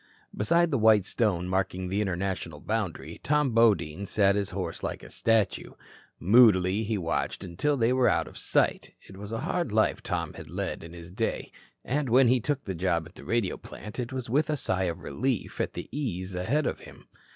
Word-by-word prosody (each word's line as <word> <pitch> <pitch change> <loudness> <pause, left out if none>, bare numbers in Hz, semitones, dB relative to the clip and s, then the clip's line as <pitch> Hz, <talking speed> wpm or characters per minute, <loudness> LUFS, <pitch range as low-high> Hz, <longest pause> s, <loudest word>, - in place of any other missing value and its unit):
Beside 170 +11 +2
the 135 - +1
white 110 -3 +5
stone 95 -7 0
marking 95 0 -1
the 100 +3 0
international 95 -5 -3
boundary, 105 -1 -3
Tom 150 -2 +2
Bodine 100 -6 +2
sat 100 0 +3
his 100 -1 -1
horse - - -4
like - - -4
a - - -12
statue. 115 -3 +1 0.5
Moodily 100 -2 +5
he 110 0 -1
watched 85 +2 -2
until 95 - -1
they 120 0 +2
were 130 -1 +4
out - - +1
of - - -12
sight. - - 0
It 95 - -12
was 100 +2 -8
a 115 - -3
hard 175 -10 -1
life 110 +1 +2
Tom - - -3
had - - -10
led - - -4
in 85 0 -10
his 85 0 -10
day 110 +4 -2 0.3
and 140 0 -1
when 125 +1 +5
he 125 +1 +4
took 140 +3 -2
the 95 - -3
job 85 -2 0
at 85 - -18
the - - -13
radio 115 -6 0
plant 105 +3 -10
it 120 0 -3
was 130 -2 -4
with 150 +7 +1
a 150 - 0
sigh 95 -6 0
of 85 -2 -3
relief 125 - -2
at - - -2
the - - -6
ease 95 -10 -3
ahead 120 +12 0
of - - -2
him. - - -14
105 Hz, 205 wpm, -28 LUFS, 95-125 Hz, 0.5 s, white